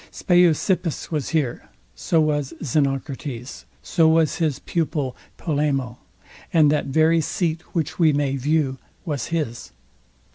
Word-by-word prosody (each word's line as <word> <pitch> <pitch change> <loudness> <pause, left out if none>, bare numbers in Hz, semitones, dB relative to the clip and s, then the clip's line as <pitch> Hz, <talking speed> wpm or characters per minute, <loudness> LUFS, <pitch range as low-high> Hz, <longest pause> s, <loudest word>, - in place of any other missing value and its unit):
Speusippus 175 -1 +1
was 150 -5 -2
here; 145 -7 -1 0.2
so 165 - 0
was 150 -1 0
Xenocrates; 135 -2 -2 0.2
so 165 -1 +3
was 160 -1 +3
his 155 -6 0
pupil, 145 -5 -2 0.2
Polemo, 140 -6 -1 0.5
and 155 -3 +5
that 150 - 0
very 160 +4 +3
seat 165 +1 -1
which 160 0 -2
we 160 -3 +5
may 140 -1 0
view 135 -1 0 0.3
was 145 -8 -3
his. 150 -8 -3
150 Hz, 120 wpm, -23 LUFS, 135-160 Hz, 0.5 s, and